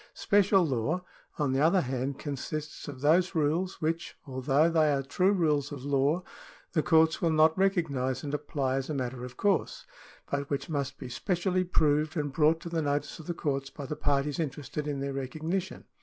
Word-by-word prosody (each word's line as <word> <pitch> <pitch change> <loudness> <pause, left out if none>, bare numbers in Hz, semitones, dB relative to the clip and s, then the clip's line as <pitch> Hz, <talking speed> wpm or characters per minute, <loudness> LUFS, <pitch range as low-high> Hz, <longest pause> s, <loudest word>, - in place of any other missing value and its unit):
Special 200 -2 +4
law, 150 +6 -1 0.3
on 145 -4 0
the 135 - +1
other 170 +4 +4
hand, 130 0 -2
consists 150 +1 -5
of 135 -3 -8
those 175 +5 +3
rules 160 +5 0
which, 165 +2 -2
although 135 +3 +2
they 160 -3 +3
are 135 -1 0
true 180 +8 +2
rules 150 -7 +1
of 140 -2 -7
law, 145 +5 +1 0.5
the 160 - +2
courts 160 +2 +3
will 170 - +3
not 160 0 +4
recognise 145 - 0
and 145 -1 -4
apply 135 -3 -1
as 135 +2 -3
a 155 - -2
matter 125 -1 -3
of 125 0 -8
course, 200 -1 0 0.5
but 140 0 -2
which 140 +1 -2
must 140 -2 -2
be - - -7
specially 180 - 0
proved 155 -2 +1
and 145 -2 -2
brought 160 +1 +3
to 170 - -6
the 165 -1 -1
notice 145 +1 -2
of 160 - -11
the 175 - -2
courts 135 -3 -2
by 145 - -8
the 150 - -4
parties 145 0 0
interested 150 -1 -3
in 140 -2 -2
their 140 0 -2
recognition. 160 +8 -3
150 Hz, 190 wpm, -29 LUFS, 140-165 Hz, 0.5 s, Special